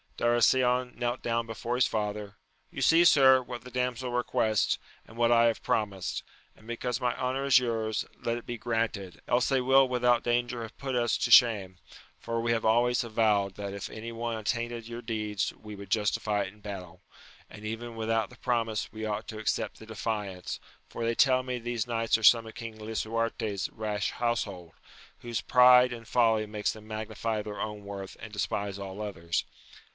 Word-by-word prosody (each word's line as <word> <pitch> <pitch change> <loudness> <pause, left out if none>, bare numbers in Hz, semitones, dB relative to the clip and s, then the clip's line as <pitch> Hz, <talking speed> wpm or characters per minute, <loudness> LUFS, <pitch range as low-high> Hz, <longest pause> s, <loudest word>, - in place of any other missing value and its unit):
Darasion 125 +1 +3
knelt 120 +1 -2
down 115 0 0
before 115 +2 -4
his 125 - +3
father; 105 -1 -3 0.2
— - - -40
You - - -6
see, 165 +1 +6
sir, 130 -5 +7
what 120 -2 -8
the 125 - -11
damsel 125 0 -2
requests, 110 -3 +1 0.3
and 110 - -14
what 120 0 +3
I 115 0 +6
have 115 -1 +1
promised; 100 -5 -1 0.3
and, 110 - -19
because 120 +1 -3
my 125 -1 0
honour 130 +2 -1
is 135 -2 +6
yours, 115 -3 0
let 115 0 -1
it 120 - -9
be 120 - -5
granted, 110 -5 -2
else 125 +1 +2
they 135 -2 +2
will 135 +1 +5
without 125 -1 +2
danger 120 0 0
have 115 - -8
put 135 -2 -3
us 120 -1 +2
to - - 0
shame, 100 -7 +6 0.4
for 115 0 -3
we 115 0 0
have 115 -1 0
always 120 +2 +3
avowed 105 -4 +1
that 100 -1 -5
if 100 - -5
any 115 +2 -7
one 115 0 -3
attainted 120 +1 -3
your 120 0 -6
deeds 110 -3 -2
we 105 -1 -10
would 100 0 -10
justify 105 -1 +1
it 95 0 -7
in 105 - -21
battle; 95 -3 -8 0.5
and 105 0 -11
even 115 +2 -5
without 110 -1 0
the - - -15
promise 115 -4 -1
we 110 0 -5
ought 105 -1 -3
to 110 - -6
accept 110 - -1
the 110 - -12
de 110 - -9
fiance, 100 -5 -3 0.3
for 115 - -6
they 115 0 0
tell 130 0 +4
me 125 -1 -3
these 120 -1 -3
knights 115 -1 +1
are 115 - -9
some 115 +1 +7
of 110 - -9
King 115 -2 -7
Lisuarte's 110 -2 -2
rash 105 -2 -2
household, 100 -8 -2 0.5
whose 120 -2 -3
pride 125 0 +6
and 115 -1 -9
folly 115 -3 +3
makes 105 0 -2
them 110 -1 -13
magnify 110 0 -3
their 105 0 -7
own 105 -1 -4
worth 100 -1 -7
and 110 - -9
despise 100 -1 -2
all 100 +1 -7
others. 85 -5 -2
115 Hz, 190 wpm, -29 LUFS, 105-120 Hz, 0.5 s, sir